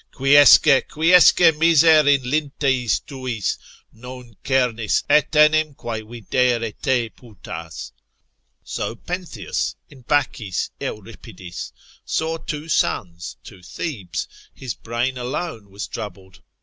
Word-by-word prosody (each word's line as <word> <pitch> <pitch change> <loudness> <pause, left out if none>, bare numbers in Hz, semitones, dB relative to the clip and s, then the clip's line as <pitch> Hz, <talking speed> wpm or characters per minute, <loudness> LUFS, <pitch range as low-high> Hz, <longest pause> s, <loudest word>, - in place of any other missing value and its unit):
Quiesce, 140 +2 +7 0.3
quiesce 165 0 +5
miser 160 -2 +5
in 140 -2 +4
linteis 135 -3 0
tuis, 130 -7 -3 0.4
Non 125 0 -11
cernis 125 -4 0
etenim 150 0 +3
quae 115 -2 -5
videre 115 +1 -1
te 120 -1 -1
putas. 85 -8 -10 0.7
So - - -4
Pentheus 175 - -4 0.2
(in 135 -3 -15
Bacchis 120 - -1
Euripidis) 95 -4 -8 0.3
saw 160 +1 -2
two 155 -1 -6
suns, 85 - -2
two 90 - -13
Thebes, 100 - -5 0.3
his 130 -4 -6
brain 120 +3 -3
alone 125 - -5
was 100 +1 -7
troubled. 95 -2 -9
125 Hz, 100 wpm, -21 LUFS, 110-150 Hz, 0.7 s, Quiesce